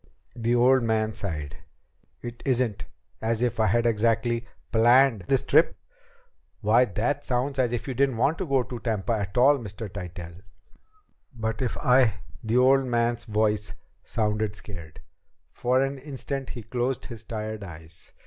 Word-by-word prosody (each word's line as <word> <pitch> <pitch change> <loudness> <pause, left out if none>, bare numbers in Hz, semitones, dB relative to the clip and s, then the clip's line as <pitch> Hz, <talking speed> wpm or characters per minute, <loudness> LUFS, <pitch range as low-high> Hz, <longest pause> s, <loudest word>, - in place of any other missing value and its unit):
The 120 0 +1
old 130 +2 +5
man 110 -1 0
sighed. 80 -9 -5 0.7
"It 120 0 -7
isn't 120 -6 0 0.4
as 115 +1 0
if 120 -1 -1
I 110 - +4
had 120 +4 +2
exactly 115 +1 +1 0.2
planned 120 -2 +5
this 135 -2 +2
trip." 155 +4 +3 0.8
"Why, 115 +2 +4
it 145 +6 0
sounds 130 +2 -1
as 125 -2 +2
if 120 +1 -3
you 135 - -2
didn't 135 -1 +1
want 145 +7 +1
to 190 - -2
go 135 -3 +2
to 120 -1 -7
Tampa 110 -3 -1
at 100 0 -3
all, 140 +3 +5
Mr. 110 -1 -7
Tytell!" 90 -2 -8 1.0
"But 110 0 -3
if 125 - -1
I 125 -5 +4
" - - -20
The 115 +2 +1
old 135 +1 +5
man's 120 -1 0
voice 105 -1 0 0.3
sounded 105 -1 -1
scared. 85 -7 -10 0.5
For 130 +2 +1
an 135 0 -3
instant 135 -1 -4
he 120 - -7
closed 125 +3 -2
his 120 -3 -9
tired 110 -1 -5
eyes. 80 -2 -11
115 Hz, 160 wpm, -26 LUFS, 105-125 Hz, 1.0 s, old